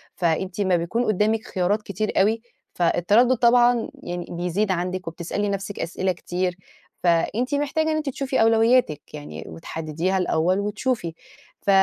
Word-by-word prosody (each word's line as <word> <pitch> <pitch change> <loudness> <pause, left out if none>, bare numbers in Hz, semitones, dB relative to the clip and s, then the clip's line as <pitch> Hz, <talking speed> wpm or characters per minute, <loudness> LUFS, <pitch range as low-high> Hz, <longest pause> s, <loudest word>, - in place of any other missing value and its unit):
فأنتِ 180 +3 -1
امّا 190 -3 +3
بيكون 175 +9 0
قدّامِك 215 +2 +1
خيارات 195 +3 0
كتير 210 +1 -2
أوي، 220 +3 +2 0.3
فالتردُّد 205 +9 +3
طبعًا 240 0 +4
يعني 175 0 -4
بيزيد 180 +4 -1
عندِك 185 0 -2
وبتسألي 175 +5 -3
نفْسِك 195 0 -4
أسئلة 185 +3 -1
كتير، 180 0 -3 0.5
فأنتِ 205 - +1
محتاجة 305 +2 0
إن - - +1
أنتِ 305 -2 -1
تشوفي 270 0 -1
أولوياتك 225 - +4
يعني، 150 -1 -7
وتحدديها 165 +3 -3
الأول 180 +1 +1
وتشوفي، 210 -3 -2 0.5
ف - - -3
195 Hz, 135 wpm, -23 LUFS, 175-225 Hz, 0.5 s, طبعًا